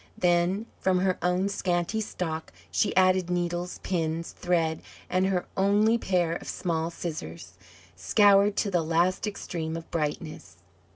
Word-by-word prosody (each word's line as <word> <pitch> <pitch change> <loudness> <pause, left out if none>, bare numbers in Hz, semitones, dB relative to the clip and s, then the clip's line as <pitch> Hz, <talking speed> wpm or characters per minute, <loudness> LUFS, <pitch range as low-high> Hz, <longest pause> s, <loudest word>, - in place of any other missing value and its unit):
Then 180 +4 +2
from 185 -1 +2
her 185 -1 +1
own 180 +3 +1
scanty 185 +1 -1
stock 160 -6 -4 0.2
she 90 - +1
added 185 -1 +4
needles, 175 0 -2
pins, 165 -2 -2
thread, 165 -3 0 0.3
and 185 +1 +2
her 185 -2 0
only 205 +4 +3
pair 180 -5 +1
of - - -12
small 165 -2 -2
scissors, 90 - -6 0.4
scoured 200 - +4
to 205 - 0
the 175 -2 +2
last 170 +5 +1
extreme 165 -5 -4
of 165 - -10
brightness. 155 - -4
175 Hz, 135 wpm, -27 LUFS, 165-190 Hz, 0.4 s, added